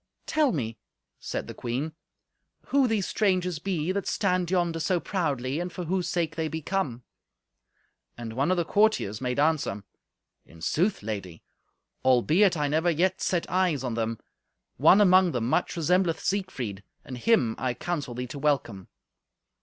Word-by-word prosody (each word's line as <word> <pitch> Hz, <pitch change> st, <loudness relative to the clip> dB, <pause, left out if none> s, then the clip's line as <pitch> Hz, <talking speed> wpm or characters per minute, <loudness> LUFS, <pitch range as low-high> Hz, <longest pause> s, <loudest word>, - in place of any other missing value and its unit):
"Tell 305 Hz, -4 st, +2 dB
me," 115 Hz, -7 st, -3 dB, 0.4 s
said -, -, -4 dB
the -, -, -8 dB
queen, 130 Hz, +7 st, -3 dB, 0.8 s
"who 275 Hz, -2 st, +4 dB
these 215 Hz, -5 st, 0 dB
strangers 180 Hz, -5 st, 0 dB
be 175 Hz, -1 st, -1 dB
that 200 Hz, +1 st, -2 dB
stand 180 Hz, -3 st, 0 dB
yonder 175 Hz, -3 st, 0 dB
so 175 Hz, +3 st, +1 dB
proudly, 145 Hz, -7 st, -2 dB
and 175 Hz, +1 st, -3 dB
for 180 Hz, -, -5 dB
whose 180 Hz, +1 st, -1 dB
sake 165 Hz, -3 st, -1 dB
they 160 Hz, -1 st, -1 dB
be 160 Hz, +1 st, -4 dB
come." 150 Hz, -8 st, -2 dB, 1.1 s
And 115 Hz, -2 st, -6 dB
one 135 Hz, +6 st, 0 dB
of 185 Hz, -, +2 dB
the 170 Hz, -, +1 dB
courtiers 200 Hz, -, +2 dB
made 125 Hz, -1 st, -2 dB
answer. 145 Hz, -10 st, +1 dB, 0.6 s
"In 85 Hz, -, -17 dB
sooth, 170 Hz, -, 0 dB
Lady, 100 Hz, -6 st, -6 dB, 0.6 s
albeit 155 Hz, -, +4 dB
I 150 Hz, -1 st, +1 dB
never 160 Hz, +4 st, +1 dB
yet 180 Hz, +3 st, +1 dB
set 175 Hz, -2 st, 0 dB
eyes 180 Hz, -7 st, +1 dB
on 125 Hz, -3 st, -2 dB
them, 115 Hz, 0 st, -2 dB, 0.6 s
one 200 Hz, -, +6 dB
among 185 Hz, -2 st, +5 dB
them 120 Hz, -2 st, -1 dB
much 175 Hz, -, 0 dB
resembleth 170 Hz, 0 st, +2 dB
Siegfried, 135 Hz, -, -3 dB, 0.2 s
and 130 Hz, -, -7 dB
him 125 Hz, -, +2 dB
I 125 Hz, -1 st, -1 dB
counsel 150 Hz, -8 st, -4 dB
thee 125 Hz, +1 st, -3 dB
to 135 Hz, +3 st, -8 dB
welcome. 135 Hz, -10 st, -1 dB
160 Hz, 160 wpm, -27 LUFS, 125-185 Hz, 1.1 s, one